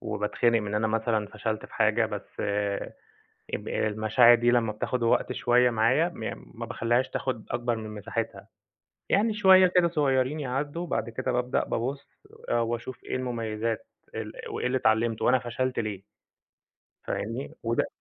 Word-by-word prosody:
وباتخنق 110 +2 +1
من 105 0 -4
أنا 110 +1 +1
مثلًا 110 -1 0
فشلت 110 0 -4
في - - -16
حاجة 110 +1 +3
بس 105 -2 -7 1.1
اب - - -3
المشاعر 110 +3 +4
دي 120 +1 +2
لمّا 115 -3 +2
بتاخد 120 +3 -2
وقت 115 - +2
شوية 125 0 +3
معايا 120 +9 +3
م - - -6
ما - - -3
باخلّيهاش 120 +3 0
تاخد 125 -5 -3
أكبر 120 0 0
من 110 -1 -6
مساحتها. 110 +2 -4 0.6
يعني 215 +2 +2
شوية 190 -3 +7
كده 180 -1 +3
صغيرين 145 -2 +1
يعدّوا، 145 +4 -2
وبعد 170 -8 -2
كده 125 +3 -2
بابدأ 125 +1 0
بابُص 135 +4 -3 0.4
آآ 120 - +2
وأشوف 120 +2 -4
إيه - - -3
المميزات 115 -3 -3 0.3
ال - - -5 0.2
وإيه - - -2
اللي 130 +1 +1
اتعلمته، 110 -1 +1
وأنا 130 +1 +5
فشلت 125 +1 -2
ليه. 105 -4 -3 1.0
فاهمني؟ 115 +6 -4
وده 115 +1 +1
120 Hz, 150 wpm, -27 LUFS, 110-130 Hz, 1.1 s, شوية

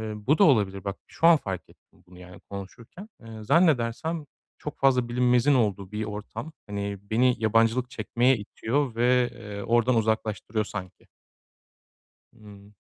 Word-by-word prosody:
bu 125 +9 +1
da - - +5
olabilir 100 - +2
bak 100 0 -4
şu 165 - +1
an 170 -2 +7
fark 95 -8 -6
ettim - - -25
bunu 90 0 -15
yani 90 0 -13
konuşurken, 115 - -10
eee, 110 -1 -10
zannedersem 155 +2 +1 0.3
çok 150 - -7
fazla 125 -3 +3
bilinmezin 125 +3 +3
olduğu 100 -5 0
bir 105 +1 -3
ortam. 110 +7 -7 0.2
Hani 100 0 -4
beni 120 +5 +2
yabancılık 115 +3 +2
çekmeye 120 +2 +1
itiyor 115 +5 -2
ve, 125 +1 +3
eee, 105 -4 -8
oradan 120 +2 +2
uzaklaştırıyor 110 -1 -1
sanki. 95 -2 -8 1.3
Hı. 105 -1 -15
115 Hz, 140 wpm, -26 LUFS, 105-125 Hz, 1.3 s, an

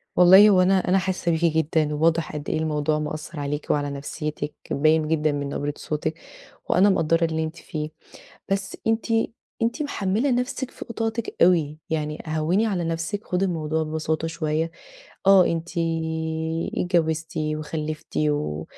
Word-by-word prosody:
والله 190 +4 +8
هو 185 -2 +5
أنا 185 0 +3
أنا 185 - +4
حاسة 185 -2 0
بيكِ 165 +1 -1
جدًا، 155 -1 +1
وواضح 160 +1 +1
قد 150 -1 -5
إيه - - 0
الموضوع 155 -1 0
مأثر 155 +1 -5
عليكِ، 145 +1 -3
وعلى 145 -1 0
نفسيتِك، 145 +1 -4 0.2
باين 155 +2 +3
جدًا 155 -1 +1
من 145 -1 -3
نبرة 145 +1 -2
صوتِك، 155 +1 -3 0.5
وأنا 195 +3 +5
مَقَدرة 165 -3 +2
اللي 160 -1 -1
أنتِ 160 +1 -5
فيه. 155 -2 -5 0.6
بس 195 0 -2
أنتِ 225 0 +1 0.6
أنتِ 235 +7 0
محملة 225 -1 0
نفسِك 250 +1 -1
فوق - - -9
طاقتِك 225 0 -3
أوي، 160 -4 +3
يعني 150 -1 -2
هَوّني 160 +7 +1
على 185 -6 -1
نفسِك، 165 +5 -3
خدّي 180 +1 0
الموضوع 160 -3 -1
ببساطة 155 +1 -2
شوية. 160 0 -1 0.6
آه، 195 -2 +7
أنتِ 165 0 -2 1.1
اتجوزتِ 165 -3 0
وخلفتِ 155 0 -3
و 145 - 0
160 Hz, 145 wpm, -24 LUFS, 155-185 Hz, 1.1 s, والله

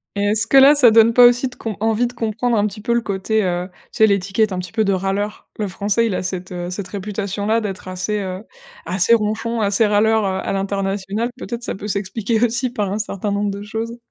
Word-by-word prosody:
Et 200 - -1
est-ce 220 +2 +1
que 275 - +4
là, 275 +2 +8
ça 275 -5 +6
donne 225 +1 +5
pas 245 +1 +8
aussi 245 +2 +4
de 250 - -11
comp 220 -2 -5
envie 225 +2 +1
de 240 - -10
comprendre 230 +1 -1
un 205 - +2
petit 210 +1 -8
peu 235 +2 0
le 235 - +2
côté, 210 +1 -1
heu, 180 0 -2 0.2
tu - - -10
sais 220 - +6
l'étiquette 200 +1 +1
un 185 - -3
petit 180 - -6
peu 220 - +1
de 200 - +1
râleur? 195 +2 -3
Le 210 - -1
français, 205 +4 0
il 200 - -2
a - - -2
cette, 185 0 -5
heu, 175 -1 -5
cette 185 0 -5
réputation-là 205 +2 -2
d'être 195 -2 -6
assez, 185 +3 -2
heu, 190 0 -5 0.4
assez 185 +6 +2
ronchon, 225 +1 0
assez 205 +2 +2
râleur, 215 +1 +2
heu, 190 -1 -1
à - - -2
l'international. 195 +3 -2
Peut-être 235 -2 -6
ça - - -4
peut 205 +2 -7
s'expliquer 205 +3 -1
aussi 240 +2 +1
par 210 -6 -2
un 205 - -1
certain 205 -1 -3
nombre 200 0 -1
de 200 +1 -6
choses. 225 +3 -5
210 Hz, 240 wpm, -20 LUFS, 195-225 Hz, 0.4 s, là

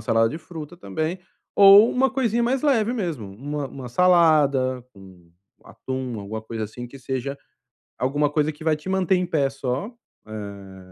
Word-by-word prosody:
salada 115 0 +2
de 155 - -6
fruta 160 0 -9
também 160 - -3 0.4
ou 200 +3 +8
uma 265 +1 +2
coisinha 240 -3 0
mais 260 +3 0
leve 240 -6 +2
mesmo, 165 - -4
uma 140 +7 -5
uma 130 0 -8
salada 145 -7 +3
com 95 -3 -16 0.3
atum, 130 -4 -5
alguma 110 +2 -6
coisa 110 0 -5
assim, 120 +3 -8
que 135 +3 -13
seja 130 +2 -4 0.6
alguma 145 +4 +1
coisa 150 0 +1
que 150 +1 -13
vai 160 -1 +2
te 150 +5 -8
manter 190 -1 +2
em 180 - 0
pé 140 -5 +1
só, 135 +5 -3 0.4
eh, 100 -3 -8
140 Hz, 165 wpm, -23 LUFS, 120-180 Hz, 0.6 s, ou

